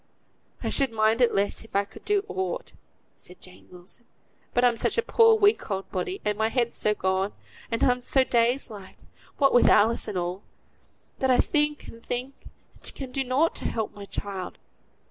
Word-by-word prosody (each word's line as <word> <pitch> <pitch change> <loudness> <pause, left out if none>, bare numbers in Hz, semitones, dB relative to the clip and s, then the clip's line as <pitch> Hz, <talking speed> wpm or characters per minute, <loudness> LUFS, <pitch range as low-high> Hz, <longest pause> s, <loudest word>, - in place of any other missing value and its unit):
"I - - -1
should 275 -4 +3
mind 220 +2 +2
it 240 - +5
less 200 +2 -1
if 225 - -15
I 200 0 +2
could - - -15
do 410 -1 +1
aught," 430 +7 -4 0.4
said 180 - -12
Jane 185 0 -15
Wilson; 180 +6 -11 0.5
"but 245 +1 +2
I'm 240 -1 +3
such - - -1
a 465 - +2
poor 455 -1 +5
weak 415 - +2
old 195 -1 -4
body, 370 - -3
and 210 0 -1
my 220 0 +2
head's 235 -1 -1
so 210 0 +1
gone, 190 +1 -1 0.4
and 230 - -1
I'm 250 0 +3
so 265 +2 +3
dazed 245 +1 +1
like, 200 -3 -11 0.4
what 275 -2 +3
with 245 - +5
Alice 225 +3 +3
and 195 - -3
all, 180 +2 -3 0.8
that 265 - +1
I 250 - +5
think 295 -1 +1
and 230 0 -12
think, 250 +3 -3 0.5
and - - -7
can 265 -2 -7
do 270 +1 -1
nought 265 +6 +1
to - - -5
help 220 -2 -2
my 200 0 -9
child. 195 -2 -6
235 Hz, 195 wpm, -26 LUFS, 200-275 Hz, 0.8 s, it